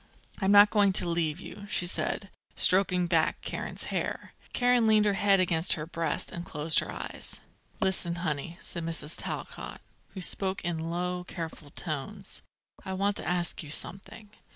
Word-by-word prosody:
I'm 195 0 +2
not 205 0 +8
going 205 -3 +4
to 180 - +4
leave 170 -3 0
you," 205 +1 -10
she 180 - +1
said, 190 +2 +1 0.2
stroking 185 -1 +4
back 165 -2 +2
Karen's - - -2
hair. - - -3 0.2
Karen 245 -2 +3
leaned 215 -1 +5
her 205 - +3
head 195 0 +4
against 170 -2 +4
her 150 - -4
breast, 165 -2 -2
and 170 - -6
closed 155 -1 +3
her - - -4
eyes. - - -5 0.4
"Listen, 190 -4 -1
honey," 155 +3 -3
said 170 - -3
Mrs. 165 -2 -4
Talcott, - - -6 0.4
who 190 - -5
spoke 190 +1 0
in 165 -1 -2
low, 180 +1 -2
careful 160 -4 -7
tones: 175 +7 -6 0.4
"I 190 - -5
want 200 +2 0
to - - -2
ask 175 -1 -1
you 155 - -9
something. 195 +6 -3
180 Hz, 165 wpm, -29 LUFS, 165-195 Hz, 0.4 s, not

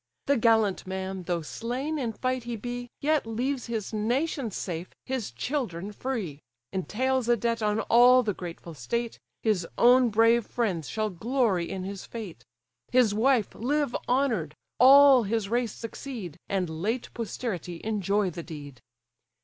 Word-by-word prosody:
The 280 - +3
gallant 220 -5 +2
man, 190 -1 -4
though 170 -1 -1
slain 255 - -3
in 235 -4 -2
fight 255 +1 -2
he 240 -1 -3
be, 245 +2 -5
Yet 300 -4 +1
leaves 250 +4 -2
his 225 -3 -4
nation 245 +4 0
safe, 175 -2 -4 0.2
his 260 -4 -3
children 195 - -3
free; 210 - -4 0.3
Entails 250 +6 0
a 240 - +4
debt 230 0 -1
on 210 +1 +1
all 250 +2 +6
the 210 -3 -1
grateful 170 -2 -8
state; 230 - -3 0.2
His 200 -7 +1
own 245 +1 +6
brave 230 +1 +4
friends 190 - -1
shall 215 -1 -1
glory 210 -2 0
in 190 -1 -4
his 195 0 -6
fate; 200 - -8 0.5
His 245 -5 +4
wife 235 0 +2
live 285 +2 -1
honour'd, 235 - +1 0.2
all 270 +1 +8
his 220 -1 -1
race 235 -1 0
succeed, 230 - -7
And 190 -3 0
late 225 +6 -2
posterity 200 -7 -4
enjoy 205 -2 0
the 170 - -6
deed!" 145 -6 -10
225 Hz, 150 wpm, -27 LUFS, 190-250 Hz, 0.5 s, all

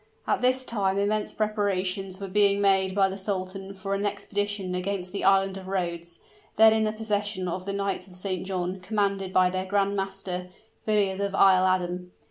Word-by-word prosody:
At - - 0
this 255 +1 +2
time 195 -5 0
immense 210 +1 0
preparations 195 -3 -1
were 200 - -5
being 200 +1 +3
made 190 -1 +3
by 195 -1 +4
the 195 +1 -6
sultan 195 0 -4
for 195 +1 -4
an 200 0 -1
expedition 205 -2 -2
against 180 0 -3
the 200 - -4
Island 195 0 +3
of 190 - -11
Rhodes, 170 -3 -3 0.4
then 220 0 +7
in 220 0 +2
the 215 - +1
possession 205 -3 -2
of 185 +2 -4
the 200 - -2
Knights 200 -1 -2
of 180 - -13
St. 185 -1 -3
John, 185 0 -3
commanded 195 -1 -1
by 185 -1 +4
their 185 0 -2
grand 200 0 +1
master, 195 -2 -4 0.4
Villiers 200 -3 +1
of 200 -1 -1
Isle 185 -1 +5
Adam. 180 -1 -1
195 Hz, 185 wpm, -26 LUFS, 185-200 Hz, 0.4 s, then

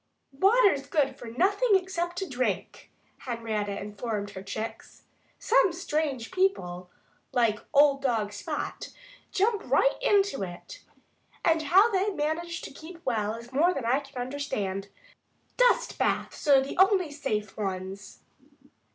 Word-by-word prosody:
"Water's 385 - +4
good 275 -3 +1
for 240 - -10
nothing 400 - +2
except 355 -2 -1
to 385 +1 -2
drink," 255 -3 -3 0.3
Henrietta 220 -4 -3
informed 205 0 -4
her 190 - -8
chicks. 215 +3 -7 0.3
"Some 435 -5 +3
strange 300 -7 -2
people, 185 - 0 0.4
like 230 -4 +2
old 280 -1 +5
dog 225 -6 0
Spot, 205 - -5 0.4
jump 420 +2 +1
right - - +3
into 400 - +2
it. 185 - -8 0.6
And 325 -1 +3
how 385 +9 +5
they 390 +1 +1
manage 335 0 -2
to - - -7
keep 330 +4 -11
well 220 -3 0
is 235 +2 -11
more 340 +7 +3
than 270 - -3
I 250 +4 +3
can 275 -3 -10
understand. 230 -8 -3 0.7
Dust - - +2
baths - - -1
are 275 -2 +7
the 270 +5 -5
only 380 -4 +4
safe 270 -8 -3
ones." 195 -1 -5
275 Hz, 135 wpm, -28 LUFS, 220-365 Hz, 0.7 s, are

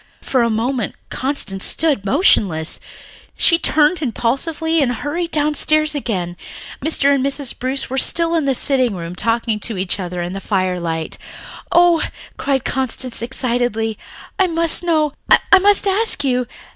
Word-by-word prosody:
For 260 - +1
a 235 - +2
moment 230 +1 -2 0.2
Constance 255 -8 -3
stood 285 -12 +1
motionless. 195 - +2
Then - - -24 0.5
she 335 -2 +4
turned 310 +2 +3
impulsively 310 +6 -1
and 260 -3 +1
hurried 295 +8 -3
downstairs 305 0 +1
again. 185 -11 -3 0.5
Mr. 285 -2 +3
and 270 -2 +1
Mrs. 275 -1 -1
Bruce 260 +2 -2
were 265 +1 -2
still 335 +3 +3
in 325 -3 +1
the 270 -1 +2
sitting 255 -5 +1
room 170 -1 -6
talking 225 +1 0
to 220 -1 -2
each 185 +2 -1
other 180 -1 -4
in 175 +1 -5
the 195 - -5
firelight. 180 -5 -2 0.5
"Oh," 345 -1 +5 0.3
cried 270 -2 -1
Constance 260 -2 -3
excitedly. 235 -3 -1 0.4
"I 380 - +4
must 335 0 +1
know, 310 -4 +1 0.4
I 385 - +9
must 410 +1 +3
ask 395 -5 +1
you. 250 -2 0
265 Hz, 150 wpm, -18 LUFS, 220-310 Hz, 0.5 s, I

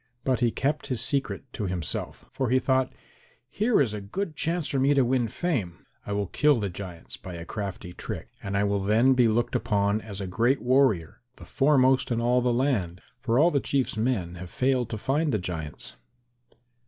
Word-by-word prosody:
But 130 -2 +1
he 120 -2 +3
kept 145 +6 -1
his 125 -3 -2
secret 130 -5 -1
to 105 - -3
himself, 90 -4 -4
for 130 -3 -2
he 130 - +4
thought, 130 0 +1 0.6
"Here 220 +2 +2
is 120 -7 +2
a 105 - -4
good 155 - -4
chance 165 +1 -1
for 135 - -1
me 140 +2 +3
to 135 -2 +4
win 125 -1 +1
fame. 110 - -3 0.2
I - - -4
will 100 0 0
kill 145 +7 +3
the 100 -3 -2
giants 90 -2 -8
by 90 -2 -8
a 85 0 -7
crafty 95 -3 -5
trick - - -6
and 100 0 -2
I 100 - +2
will 100 -1 0
then 115 +6 +4
be 125 -2 +4
looked 115 +2 0
upon 100 0 +1
as 105 -3 -8
a 100 - -3
great 120 +8 +1
warrior, 120 - +2
the - - -13
foremost 135 -2 +3
in 115 - +1
all 120 +1 +2
the 125 0 +1
land, 120 -9 0 0.2
for 120 0 0
all 165 +5 +5
the 140 - +2
Chief's 135 -2 0
men 110 -6 -1
have 90 - -7
failed 125 0 0
to 110 - -3
find 145 +7 0
the 110 - +1
giants." 80 -5 -6
120 Hz, 205 wpm, -26 LUFS, 100-135 Hz, 0.6 s, all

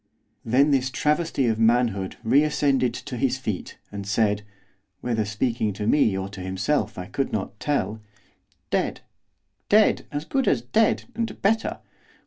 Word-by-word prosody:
Then 135 +6 +3
this 130 -2 +2
travesty 150 0 0
of 110 -2 +1
manhood 115 -4 +2
reascended 140 -1 +2
to 130 -1 -6
his 130 +1 +1
feet, 110 -8 -5
and 100 -1 -6
said, 105 0 +1 0.6
whether 115 -3 0
speaking 110 +1 -1
to 105 +2 -4
me 110 -5 +3
or 95 0 -3
to 100 -1 -9
himself 95 +11 -1
I 90 - -5
could 135 +8 -2
not 100 0 -4
tell, 110 -7 -1 0.7
'Dead! - - 0 0.7
dead! 215 +1 +4
as 145 +1 -3
good 270 +5 0
as 120 -4 +2
dead! 215 - +2
and 230 0 -3
better! 225 +3 +1
120 Hz, 145 wpm, -24 LUFS, 105-145 Hz, 0.7 s, dead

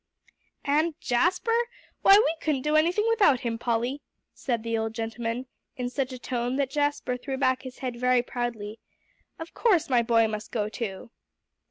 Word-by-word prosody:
"And 305 +2 +1
Jasper? 355 - +1 0.5
Why, 390 - +8
we 415 -7 +3
couldn't 285 -5 0
do 300 0 +1
anything 345 +7 +3
without 415 - +4
him, 230 -1 -2
Polly," 240 +4 -1 0.3
said 235 -4 -2
the 230 0 -1
old 225 0 -2
gentleman 230 +2 -3 0.3
in 245 -1 -3
such 265 -1 -2
a 255 - -6
tone 245 0 -2
that 275 -1 0
Jasper 290 -3 0
threw 265 +1 -4
back 260 -1 +2
his 260 -2 -9
head 250 -3 -5
very 250 -1 +3
proudly; 230 -4 -4 0.6
"of 325 0 -8
course 350 - +2
my 245 -2 +5
boy 230 -1 +3
must 215 0 -5
go 210 -2 -1
too." 215 0 -6
250 Hz, 170 wpm, -27 LUFS, 230-290 Hz, 0.6 s, Why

